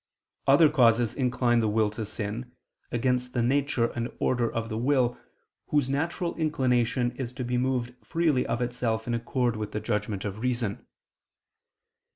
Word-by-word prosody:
Other 145 +4 +7
causes 120 -5 +3
incline 125 -2 +2
the 110 - +2
will 105 0 +2
to 105 0 -5
sin, 115 +5 -5 0.4
against 125 +1 0
the 120 - +1
nature 130 -2 +1
and 120 0 -3
order 120 -2 +1
of 115 0 -3
the 110 -1 -4
will, 125 -1 +2 0.5
whose 145 -3 +1
natural 170 +5 -1
inclination 125 -6 +1
is 125 -3 -4
to 130 0 -4
be 125 0 -1
moved 125 -1 -1
freely 160 -6 +1
of 115 +1 0
itself 120 -2 -2
in 120 - -2
accord 120 +1 0
with 105 -1 -5
the 105 - -1
judgment 105 -2 -2
of 105 +1 -4
reason. 120 -4 -2
120 Hz, 160 wpm, -27 LUFS, 115-130 Hz, 0.5 s, Other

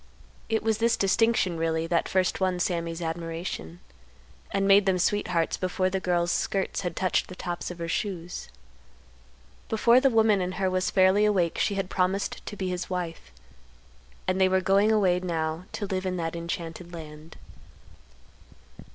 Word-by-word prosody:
It 225 -1 0
was 220 -1 +1
this 230 0 +2
distinction, 195 -3 +2
really, 160 0 0
that 170 0 0
first 185 -1 +1
won 185 -1 0
Sammy's 170 -1 -2
admiration, 165 - -5 0.7
and 195 0 0
made 200 0 +6
them 190 -1 +3
sweethearts 180 -3 0
before 185 0 -1
the 190 - 0
girl's 175 -1 +1
skirts 195 +1 -1
had 175 -2 -3
touched 185 -1 +1
the 185 - -9
tops 175 -1 -4
of 180 - -7
her 170 -1 -4
shoes. 175 - -4 1.2
Before 235 +2 +5
the 270 +1 +4
woman 220 -4 +3
in 180 0 -2
her 185 0 0
was 185 0 0
fairly 190 +2 +4
awake 190 -6 +2
she 200 - +1
had 195 -1 -2
promised 190 +2 -1
to - - -5
be 190 - -2
his 180 0 -4
wife; 175 - -4 1.0
and 185 +1 +1
they 190 - +5
were 190 0 +3
going 195 +3 +3
away 190 -5 +3
now 165 -1 -2
to 205 - -3
live 190 -1 -2
in 185 0 -2
that 165 -1 -3
enchanted 170 0 -5
land. 155 0 -10
185 Hz, 165 wpm, -27 LUFS, 170-195 Hz, 1.2 s, made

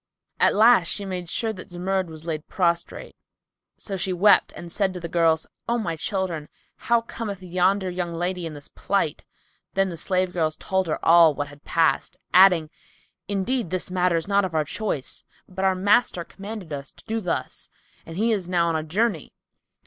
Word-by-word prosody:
At - - +4
last 220 -5 +6
she 200 +2 -2
made 180 -3 -5
sure 225 +2 -1
that 190 0 -10
Zumurrud 185 +1 -1
was 160 0 -11
laid 155 -2 -4
prostrate; 170 -2 -1 0.6
so 200 - -4
she 190 0 -1
wept 195 +3 +4
and 170 -1 -8
said 190 -1 0
to - - -4
the 170 - -5
girls, 165 -1 +2 0.2
"O 235 - +2
my 170 -8 -2
children, 170 -3 -3 0.3
how 235 0 +1
cometh 210 -4 -6
yonder 185 +2 +1
young 180 -1 -3
lady 175 +1 -2
in 155 - -8
this 145 - -8
plight?" - - -1 0.5
Then 195 0 +2
the 170 - -6
slave 185 +2 0
girls 155 -3 0
told 190 -1 -1
her 155 - -1
all 165 -2 +7
what 145 +1 -3
had 145 0 -16
passed, 165 -1 +1 0.2
adding, 180 -4 +6 0.6
"Indeed 205 +2 -1
this 185 0 -3
matter 180 -1 +2
is 165 - -3
not 200 0 +3
of 180 -4 -3
our 155 -1 +2
choice; 185 - -4 0.2
but 190 +1 -3
our 190 -1 +3
master 195 -1 +2
commanded 200 -3 -8
us 140 -1 -6
to - - -17
do 225 0 -2
thus, 180 -4 -3 0.3
and 165 +1 -9
he 225 +3 +2
is 190 -5 -1
now 170 -2 +2
on 165 - 0
a 160 - 0
journey." 180 +2 -1
180 Hz, 190 wpm, -24 LUFS, 165-195 Hz, 0.6 s, all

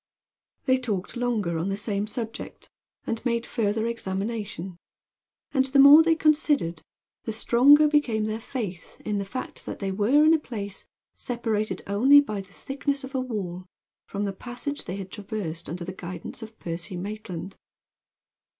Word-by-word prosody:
They 260 -1 +3
talked 210 -6 -3
longer 220 -9 0
on 175 +4 -1
the 195 - -1
same 205 -1 -1
subject, 225 0 -6 0.3
and 225 -1 -3
made 235 -1 0
further 220 -1 0
examination; 195 -4 -4 0.8
and 265 -2 +3
the 270 +1 +1
more 280 +3 +10
they 325 0 +4
considered 295 - +2 0.4
the - - -2
stronger 275 +7 +6
became 255 -8 +2
their 215 +1 -2
faith 205 -9 -6
in 210 -1 0
the 200 - -3
fact 255 +6 -6
that - - -4
they 195 -1 -2
were 230 +10 +4
in 315 - +7
a 325 - +4
place 205 -8 -6 0.3
separated 225 -3 -2
only 250 +9 +6
by 215 -8 -1
the 195 0 -16
thickness 280 +5 -3
of 265 +1 -8
a 260 - 0
wall 185 -7 -4 0.4
from 200 0 -3
the 200 -1 -2
passage 250 +7 -5
they 180 - -4
had 195 -2 -7
traversed 195 -7 -5
under 170 +2 -5
the 185 - -5
guidance 180 +5 -7
of 220 0 -10
Percy 175 +2 -5
Maitland. 190 -2 -6
215 Hz, 160 wpm, -26 LUFS, 195-255 Hz, 0.8 s, more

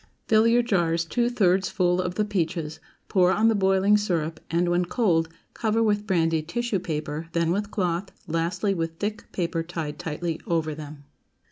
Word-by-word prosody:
Fill 220 +1 +5
your 240 +1 +4
jars 170 -6 +1
two 240 +7 +1
thirds 190 -5 +2
full 180 -3 +1
of 180 0 -3
the 210 - +1
peaches, 165 -5 -2 0.3
pour 185 -2 +4
on 220 +4 +3
the - - +3
boiling 195 0 +3
syrup, 165 -6 -1
and, 170 +1 +1
when 175 +1 +2
cold, 170 -5 +1 0.2
cover 225 0 +1
with 210 -1 +1
brandy 165 -4 +2
tissue 220 +5 -2
paper, 155 -2 -4
then 170 -1 +1
with 205 +3 -1
cloth, 180 -1 -1 0.2
lastly 175 +5 0
with 165 -2 -3
thick 210 +4 -4
paper 170 -2 -1
tied 165 -3 -5
tightly 165 +1 -3
over 160 -2 0
them. 150 -1 -9
180 Hz, 170 wpm, -25 LUFS, 165-205 Hz, 0.3 s, Fill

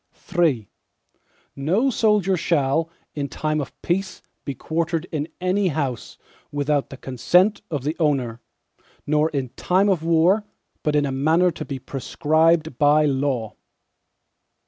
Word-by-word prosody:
III 145 - +2 0.9
No 185 - +1
soldier 210 -5 +2
shall, 160 -1 +1 0.2
in 140 -2 -3
time 155 +3 -1
of 140 - -9
peace 185 +2 -2 0.2
be 140 - -4
quartered 165 +4 -2
in 155 -2 -2
any 185 +2 +1
house, 140 -7 -3 0.3
without 145 0 0
the 135 - -9
consent 175 - +2
of 145 -5 -3
the 150 +3 -1
owner, 130 -7 0 0.6
nor 150 +1 +2
in 135 -4 -3
time 190 - +1
of 185 -5 +1
war, 170 +6 +3 0.4
but 150 -1 0
in 145 -1 +3
a 140 - -2
manner 160 +7 +3
to - - -7
be 140 - -5
prescribed 155 +3 +1
by 150 +1 +5
law. 135 -5 -1
155 Hz, 135 wpm, -23 LUFS, 140-175 Hz, 0.9 s, by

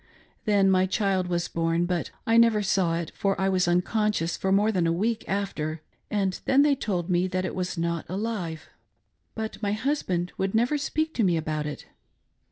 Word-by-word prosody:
Then 200 -3 +4
my 185 0 +3
child 190 -2 0
was 175 -1 -1
born, 165 +1 0
but 175 -2 -2 0.2
I 225 -2 +2
never 230 -2 +5
saw 185 -4 +1
it, 170 -2 -4
for 195 -1 -1
I 190 0 +2
was 185 -2 +2
unconscious 180 0 +1
for 190 - -1
more 205 +3 +4
than 180 -5 +1
a - - +2
week 215 +6 0
after, 160 -6 -2 0.3
and 195 -3 -1
then 275 +2 +5
they 295 -1 +4
told 185 -10 -2
me 180 0 +2
that 185 0 -2
it - - -3
was 180 -1 -3
not 170 -1 -2
alive, 185 -5 -3 0.7
but 220 -1 -5
my 205 -1 0
hus 275 +7 0
band 175 -1 -2
would 190 +2 0
never 245 +6 +2
speak 315 +3 -1
to 230 - +1
me' 175 -4 +3
about 155 -1 -2
it. 150 - -7
190 Hz, 195 wpm, -26 LUFS, 175-215 Hz, 0.7 s, never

